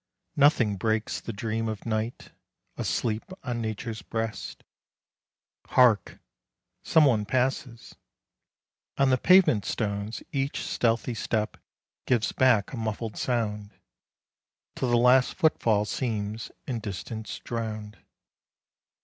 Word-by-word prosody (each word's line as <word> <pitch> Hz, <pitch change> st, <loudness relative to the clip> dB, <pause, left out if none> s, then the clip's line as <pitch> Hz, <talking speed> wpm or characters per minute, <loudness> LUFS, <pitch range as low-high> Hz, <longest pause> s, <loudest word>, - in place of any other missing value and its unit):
Nothing 125 Hz, -8 st, +4 dB
breaks 110 Hz, +2 st, -1 dB
The -, -, -5 dB
dream 110 Hz, +1 st, -2 dB
of 110 Hz, -2 st, -6 dB
Night, 110 Hz, +1 st, -3 dB, 0.4 s
asleep 110 Hz, -2 st, -1 dB, 0.2 s
on 120 Hz, -1 st, -3 dB
Nature's 110 Hz, 0 st, -4 dB
breast. 115 Hz, +2 st, -4 dB, 1.0 s
Hark! 120 Hz, -5 st, +4 dB, 0.7 s
Some 160 Hz, -2 st, +5 dB
one 115 Hz, -6 st, +3 dB
passes. 125 Hz, +1 st, -2 dB, 1.0 s
On 135 Hz, -1 st, +3 dB
the 130 Hz, -, +3 dB
pavement 180 Hz, -, +5 dB
stones 105 Hz, 0 st, -3 dB
Each 135 Hz, 0 st, -2 dB
stealthy 115 Hz, +1 st, 0 dB
step 110 Hz, -1 st, -2 dB, 0.5 s
gives 120 Hz, -4 st, +2 dB
back 120 Hz, -5 st, +3 dB
a -, -, -4 dB
muffled 110 Hz, -1 st, -3 dB
sound, 105 Hz, -4 st, -2 dB, 1.0 s
Till 130 Hz, -, -1 dB
the 120 Hz, -, +4 dB
last 125 Hz, +2 st, +4 dB
foot 160 Hz, -4 st, +2 dB
fall 105 Hz, -2 st, +2 dB
seems 110 Hz, -2 st, -3 dB, 0.2 s
in 125 Hz, -4 st, -3 dB
distance 105 Hz, +2 st, -6 dB
drowned. 110 Hz, -2 st, -5 dB
115 Hz, 110 wpm, -27 LUFS, 105-125 Hz, 1.0 s, Some